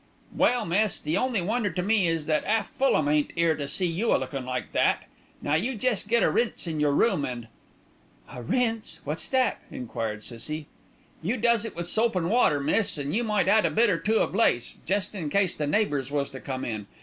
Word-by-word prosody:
"Well, 245 Hz, -3 st, +2 dB
miss, 200 Hz, +4 st, +1 dB
the 155 Hz, +2 st, -2 dB
only 250 Hz, -7 st, 0 dB
wonder 215 Hz, +3 st, 0 dB
to 180 Hz, 0 st, -3 dB
me 205 Hz, -2 st, +2 dB
is 165 Hz, -2 st, -1 dB
that 155 Hz, -1 st, +1 dB
'alf 220 Hz, 0 st, +1 dB
Fulham 260 Hz, -, +2 dB
ain't 150 Hz, 0 st, +1 dB
'ere 165 Hz, -1 st, +3 dB
to 145 Hz, -1 st, -4 dB
see 185 Hz, +6 st, 0 dB
you 180 Hz, +7 st, +1 dB
a -, -, +4 dB
lookin' 135 Hz, -3 st, -5 dB
like 125 Hz, -1 st, -4 dB
that. -, -, +2 dB, 0.4 s
Now 145 Hz, -, 0 dB
you 225 Hz, +12 st, 0 dB
jest 225 Hz, -2 st, 0 dB
get 235 Hz, +1 st, +3 dB
a -, -, +3 dB
rinse 235 Hz, -4 st, 0 dB
in 160 Hz, -3 st, -3 dB
your 150 Hz, 0 st, +3 dB
room 145 Hz, 0 st, +2 dB
an' 120 Hz, -3 st, -5 dB, 0.4 s
" -, -, -25 dB
"A 125 Hz, -, -7 dB
rinse, 225 Hz, -, -1 dB
what's 150 Hz, +3 st, -3 dB
that?" 260 Hz, -1 st, +1 dB
enquired 110 Hz, -3 st, -5 dB
Cissie. 150 Hz, +6 st, -4 dB, 0.6 s
"You 210 Hz, +10 st, -1 dB
does 235 Hz, -1 st, +2 dB
it -, -, -7 dB
with 170 Hz, 0 st, -3 dB
soap 220 Hz, +5 st, +2 dB
an' 175 Hz, -2 st, 0 dB
water, 215 Hz, -10 st, +3 dB
miss, 160 Hz, +7 st, +1 dB
an' 145 Hz, 0 st, -3 dB
you 235 Hz, +4 st, +1 dB
might 210 Hz, -4 st, +1 dB
add 215 Hz, +2 st, +5 dB
a -, -, +2 dB
bit 230 Hz, -1 st, +3 dB
or 165 Hz, -, 0 dB
two 215 Hz, +7 st, +1 dB
of -, -, 0 dB
lace, 120 Hz, -, +1 dB
jest 200 Hz, +1 st, 0 dB
in 170 Hz, -7 st, -4 dB
case 190 Hz, +1 st, +1 dB
the 150 Hz, -, -2 dB
neighbours 145 Hz, -, 0 dB
was 140 Hz, -1 st, -2 dB
to 130 Hz, -, -8 dB
come 130 Hz, -1 st, -5 dB
in. 110 Hz, -3 st, -5 dB
175 Hz, 225 wpm, -26 LUFS, 145-220 Hz, 0.6 s, add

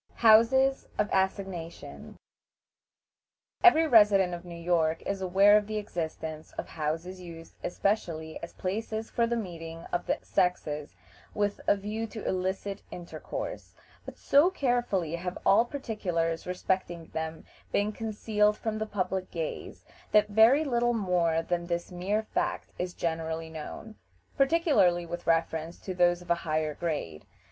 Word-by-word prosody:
HOUSES 245 Hz, +4 st, +5 dB
OF 210 Hz, -, 0 dB
ASSIGNATION. 190 Hz, -3 st, -3 dB, 1.5 s
Every 325 Hz, -3 st, +7 dB
resident 205 Hz, -, +5 dB
of 175 Hz, 0 st, -6 dB
New 170 Hz, -1 st, -9 dB
York 165 Hz, -2 st, +1 dB
is 200 Hz, -1 st, -2 dB
aware 195 Hz, +3 st, +5 dB
of 210 Hz, -1 st, +3 dB
the 215 Hz, 0 st, -3 dB
existence 160 Hz, -5 st, -5 dB
of -, -, -6 dB
houses 165 Hz, +4 st, -3 dB
used 165 Hz, -2 st, -10 dB
especially 170 Hz, -5 st, -2 dB
as 170 Hz, -, -8 dB
places 220 Hz, +3 st, -3 dB
for 235 Hz, -1 st, +2 dB
the 235 Hz, -, 0 dB
meeting 165 Hz, -6 st, -6 dB
of 175 Hz, -, -1 dB
the -, -, +1 dB
sexes 150 Hz, -5 st, -1 dB, 0.4 s
with 205 Hz, -1 st, 0 dB
a -, -, +5 dB
view 215 Hz, +3 st, -4 dB
to 220 Hz, 0 st, -7 dB
illicit 190 Hz, +2 st, -2 dB
intercourse; 175 Hz, -1 st, -7 dB, 0.3 s
but -, -, -10 dB
so 290 Hz, +6 st, +4 dB
carefully 240 Hz, -, 0 dB
have 180 Hz, +1 st, -4 dB
all 220 Hz, +4 st, +5 dB
particulars 180 Hz, -, -2 dB
respecting 180 Hz, -2 st, -2 dB
them 160 Hz, 0 st, -4 dB, 0.3 s
been 205 Hz, +1 st, +1 dB
concealed 210 Hz, -1 st, 0 dB
from 215 Hz, -1 st, -3 dB
the 220 Hz, -, -2 dB
public 190 Hz, -2 st, -2 dB
gaze, 165 Hz, -2 st, -5 dB, 0.3 s
that 210 Hz, 0 st, +5 dB
very 225 Hz, +8 st, +6 dB
little 240 Hz, -4 st, +1 dB
more 175 Hz, -5 st, +1 dB
than 175 Hz, 0 st, -2 dB
this 170 Hz, 0 st, -3 dB
mere 195 Hz, +5 st, -1 dB
fact 350 Hz, +8 st, -2 dB
is 180 Hz, 0 st, -3 dB
generally 160 Hz, -1 st, -3 dB
known, 160 Hz, +7 st, -8 dB, 0.4 s
particularly 270 Hz, -, +3 dB
with 175 Hz, +1 st, -7 dB
reference 165 Hz, 0 st, 0 dB
to 185 Hz, -, -5 dB
those 175 Hz, 0 st, +2 dB
of 175 Hz, -, -5 dB
a 170 Hz, -, +1 dB
higher 155 Hz, -1 st, -1 dB
grade. 145 Hz, -, -4 dB
185 Hz, 140 wpm, -29 LUFS, 170-215 Hz, 1.5 s, Every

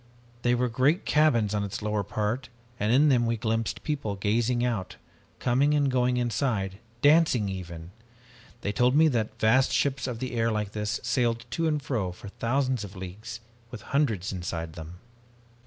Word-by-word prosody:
There 120 Hz, 0 st, +2 dB
were 125 Hz, +1 st, +1 dB
great 130 Hz, -, +2 dB
cabins 120 Hz, -9 st, +3 dB
on 105 Hz, -1 st, 0 dB
its 100 Hz, -, -4 dB
lower 105 Hz, -1 st, 0 dB
part 110 Hz, +5 st, -2 dB, 0.3 s
and 105 Hz, +2 st, +1 dB
in 145 Hz, +5 st, +5 dB
them 120 Hz, -3 st, +3 dB
we 115 Hz, 0 st, 0 dB
glimpsed 115 Hz, 0 st, -2 dB
people 140 Hz, -9 st, -2 dB
gazing 115 Hz, +5 st, +1 dB
out, 110 Hz, -7 st, -2 dB, 0.4 s
coming 135 Hz, +5 st, +2 dB
and 145 Hz, -2 st, +2 dB
going 125 Hz, -1 st, +2 dB
inside, 110 Hz, -5 st, -1 dB, 0.2 s
dancing 145 Hz, -8 st, +5 dB
even! 85 Hz, -3 st, -7 dB, 0.7 s
They 100 Hz, -, -1 dB
told 125 Hz, +4 st, +2 dB
me 160 Hz, +2 st, +6 dB
that 115 Hz, -5 st, -2 dB
vast 130 Hz, +5 st, +4 dB
ships 140 Hz, -2 st, 0 dB
of 125 Hz, -3 st, -3 dB
the 130 Hz, +1 st, -4 dB
air 115 Hz, -1 st, +1 dB
like 105 Hz, -2 st, -2 dB
this 105 Hz, 0 st, -2 dB
sailed 120 Hz, -1 st, 0 dB
to 165 Hz, 0 st, 0 dB
and 150 Hz, -1 st, +1 dB
fro 115 Hz, -10 st, -2 dB
for 90 Hz, +3 st, -10 dB
thousands 130 Hz, +2 st, 0 dB
of 100 Hz, -1 st, -9 dB
leagues 105 Hz, +6 st, -8 dB, 0.3 s
with -, -, -9 dB
hundreds 110 Hz, -11 st, +1 dB
inside 85 Hz, -3 st, -4 dB
them. 80 Hz, +1 st, -9 dB
115 Hz, 170 wpm, -27 LUFS, 105-130 Hz, 0.7 s, me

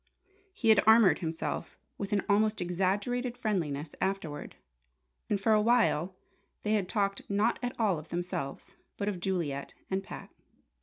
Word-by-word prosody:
He 240 Hz, -11 st, 0 dB
had 215 Hz, -2 st, +7 dB
armoured 220 Hz, -3 st, +7 dB
himself 160 Hz, -1 st, -4 dB, 0.2 s
with 200 Hz, +1 st, -4 dB
an 205 Hz, -1 st, +2 dB
almost 215 Hz, +1 st, +3 dB
exaggerated 200 Hz, +8 st, -1 dB
friendliness 165 Hz, -, -2 dB
afterward; 190 Hz, -6 st, -3 dB, 0.7 s
and 205 Hz, -, +1 dB
for 220 Hz, +2 st, +3 dB
a 210 Hz, -, +5 dB
while 210 Hz, -6 st, +2 dB, 0.5 s
they 210 Hz, -, +1 dB
had 200 Hz, -4 st, +1 dB
talked 200 Hz, 0 st, 0 dB
not 205 Hz, +4 st, +2 dB
at 245 Hz, 0 st, -4 dB
all 200 Hz, -8 st, +2 dB
of 155 Hz, -, -13 dB
themselves, 175 Hz, -, -4 dB, 0.2 s
but 200 Hz, -, -2 dB
of 200 Hz, -4 st, -1 dB
Juliet 170 Hz, -7 st, -2 dB, 0.2 s
and 190 Hz, 0 st, 0 dB
Pat. -, -, -9 dB
195 Hz, 150 wpm, -30 LUFS, 175-215 Hz, 0.7 s, had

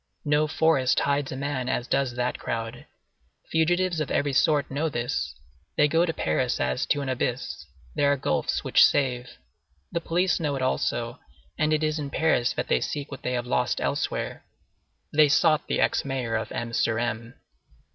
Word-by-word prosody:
No 150 Hz, +1 st, +2 dB
forest 155 Hz, -4 st, +2 dB
hides 140 Hz, -1 st, 0 dB
a -, -, -4 dB
man 135 Hz, -2 st, -2 dB
as 125 Hz, -1 st, -1 dB
does 135 Hz, -3 st, 0 dB
that 125 Hz, 0 st, -1 dB
crowd. 115 Hz, +1 st, -5 dB, 0.6 s
Fugitives 175 Hz, +2 st, +2 dB
of 155 Hz, -, -2 dB
every 145 Hz, -1 st, 0 dB
sort 145 Hz, 0 st, +2 dB
know 150 Hz, +4 st, 0 dB
this. 120 Hz, -, -2 dB, 0.4 s
They 150 Hz, -, +5 dB
go 165 Hz, +4 st, +2 dB
to -, -, +1 dB
Paris 80 Hz, -, 0 dB
as 65 Hz, 0 st, 0 dB
to 145 Hz, -, +1 dB
an 140 Hz, -, -4 dB
abyss; 125 Hz, -, -3 dB, 0.3 s
there 140 Hz, -, +2 dB
are 145 Hz, -, +2 dB
gulfs -, -, -1 dB
which -, -, +5 dB
save. 125 Hz, -3 st, +1 dB, 0.5 s
The 170 Hz, -, -1 dB
police 175 Hz, +2 st, +1 dB
know 150 Hz, -4 st, -1 dB
it 135 Hz, -, -3 dB
also, 120 Hz, -1 st, -1 dB, 0.4 s
and 155 Hz, -2 st, +1 dB
it 155 Hz, 0 st, +2 dB
is 155 Hz, 0 st, 0 dB
in 145 Hz, -2 st, -4 dB
Paris 140 Hz, -5 st, +2 dB
that -, -, -3 dB
they 60 Hz, -, +2 dB
seek 145 Hz, 0 st, -4 dB
what 135 Hz, -, -7 dB
they 125 Hz, -, -2 dB
have 120 Hz, -1 st, -1 dB
lost 125 Hz, 0 st, 0 dB
elsewhere. -, -, -2 dB, 0.7 s
They 150 Hz, 0 st, +6 dB
sought 155 Hz, +1 st, +3 dB
the -, -, 0 dB
ex -, -, +2 dB
mayor 130 Hz, -4 st, -3 dB
of 110 Hz, -, -3 dB
M. 115 Hz, 0 st, -4 dB
sur 110 Hz, -1 st, +1 dB
M. 115 Hz, +1 st, -3 dB
140 Hz, 185 wpm, -26 LUFS, 120-155 Hz, 0.7 s, They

